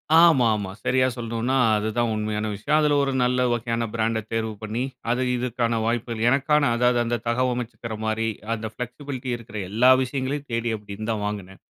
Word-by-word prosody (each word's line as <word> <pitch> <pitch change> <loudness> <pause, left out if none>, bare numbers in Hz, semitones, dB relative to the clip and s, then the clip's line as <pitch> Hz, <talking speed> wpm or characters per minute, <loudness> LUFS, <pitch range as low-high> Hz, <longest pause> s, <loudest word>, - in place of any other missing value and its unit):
ஆமா, 165 -7 +7
ஆமா 100 -3 -3
சரியா 130 0 +3
சொல்ணும்னா 115 +2 -2 0.2
அதுதான் 110 +3 0
உண்மயான 105 0 -2
விஷயம். 140 +10 +1
அதுல 150 -1 +3
ஒரு 135 - 0
நல்ல 125 +1 +2
வகையான 115 0 -1
பிராண்ட 115 0 0
தேர்வு 110 -1 -1
பண்ணி, 110 +3 -3 0.3
அது 125 +2 +1
இதுக்கான 120 -1 -1
வாய்ப்புகள் 115 -1 -1
எனக்கான 140 +1 +3
அதாவது, 125 +1 +3
அந்த 120 -1 -1
தகவமைச்சுக்குற 120 -2 -1
மாரி. 110 +1 0 0.3
அந்த 110 0 -4
ஃப்ளெக்ஸிபிலிட்டி 125 +2 -6
இருக்குற 115 -2 -9
எல்லா 120 +5 +4
விஷயங்களையும் 135 +2 -3
தேடி 115 0 0
அப்டி 100 -1 -9
இருந்த 110 +2 -2
வாங்குனே. 100 -2 -5
120 Hz, 160 wpm, -24 LUFS, 110-125 Hz, 0.3 s, ஆமா